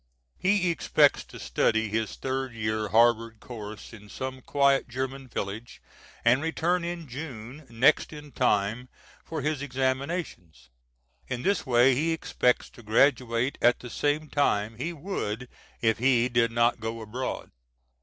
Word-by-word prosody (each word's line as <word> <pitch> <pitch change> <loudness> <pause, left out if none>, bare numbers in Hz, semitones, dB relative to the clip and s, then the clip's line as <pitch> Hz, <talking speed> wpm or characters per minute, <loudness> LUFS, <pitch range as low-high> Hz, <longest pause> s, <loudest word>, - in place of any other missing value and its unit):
He 185 -2 +2
expects 165 - +3
to - - -12
study 110 0 +1
his 110 +1 -2
third 130 -2 -3
year 110 -1 -1
Harvard 115 0 +3
course 110 -2 -9
in 105 -1 -13
some 130 +4 -5
quiet 140 -1 +2
German 130 +2 -4
village, 110 +1 -5 0.5
and 125 +4 +5
return 170 +2 0
in 170 -2 -5
June 130 0 -8
next 125 +6 +3
in 150 -1 -10
time 115 0 0 0.3
for 160 -4 -5
his 150 -1 -1
examinations. 130 - -3 0.6
In 125 -1 -4
this 200 -6 0
way 125 +1 +5
he 160 +6 +1
expects 125 -5 +1
to - - -14
graduate 120 +2 +2
at 120 0 +5
the 125 - -10
same 150 +1 0
time 110 -7 0
he 160 +8 -3
would 140 - -4 0.3
if 110 -2 +2
he 125 -1 +3
did 120 -1 +2
not 120 +1 +2
go 115 +1 -4
abroad. 120 +4 -5
125 Hz, 145 wpm, -27 LUFS, 115-145 Hz, 0.6 s, and